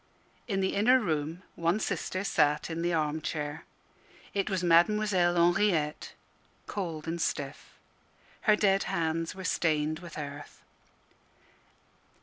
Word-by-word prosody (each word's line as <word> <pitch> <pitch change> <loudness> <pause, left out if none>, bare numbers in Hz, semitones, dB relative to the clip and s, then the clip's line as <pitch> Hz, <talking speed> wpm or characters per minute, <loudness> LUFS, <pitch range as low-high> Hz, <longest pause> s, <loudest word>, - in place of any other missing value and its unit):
In 195 -4 0
the 190 - 0
inner 245 +6 +5
room 165 -3 -2
one 170 +4 0
sister 185 -1 -2
sat 150 -4 +1
in 165 +1 -3
the 175 +1 0
arm 155 -1 0
chair. 150 0 -4 0.7
It 200 0 0
was 190 -2 -1
Mademoiselle 175 +1 +3
Henriette, 175 -3 +2 0.5
cold 165 -6 -4
and 170 +1 -2
stiff. 140 -2 -4 0.7
Her 215 - +8
dead 195 -2 +2
hands 165 +1 -1
were 190 - -7
stained 155 -3 0
with 175 -2 -10
earth. 145 -1 -8
170 Hz, 125 wpm, -29 LUFS, 155-195 Hz, 0.7 s, Her